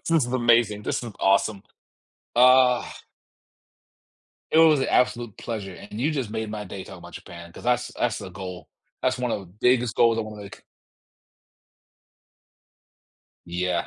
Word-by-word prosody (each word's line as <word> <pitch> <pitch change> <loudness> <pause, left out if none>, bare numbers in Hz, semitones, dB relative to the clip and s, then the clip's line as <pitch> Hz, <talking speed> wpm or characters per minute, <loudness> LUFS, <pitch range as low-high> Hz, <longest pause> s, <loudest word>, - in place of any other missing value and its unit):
this - - -6
is 160 -6 +3
amazing, 120 -4 +2
this - - -2
is 120 -2 -7
awesome. 100 +1 +2 0.7
Ugh! 125 0 +5 1.7
It 160 - +4
was 160 -3 +6
an - - 0
absolute 120 -4 +1
pleasure, 105 -5 -5
and 105 +4 -9
you 145 +5 +1
just 130 -8 -3
made 110 0 -3
my 105 -1 -5
day 95 -1 -8
talking - - -11
about - - -13
Japan, 85 0 -11
'cause - - -12
that's 125 0 +1
that's 120 -2 0
the 95 -3 -8
goal. 90 -2 -8 0.3
That's 130 0 +1
one 125 -1 -1
of - - -2
the 95 - -12
biggest 125 -2 +2
goals 115 -1 +4
I - - +2
wanna 105 -1 -7
make. 100 - -12 2.8
Yeah. 90 0 -1
115 Hz, 155 wpm, -24 LUFS, 100-125 Hz, 2.8 s, was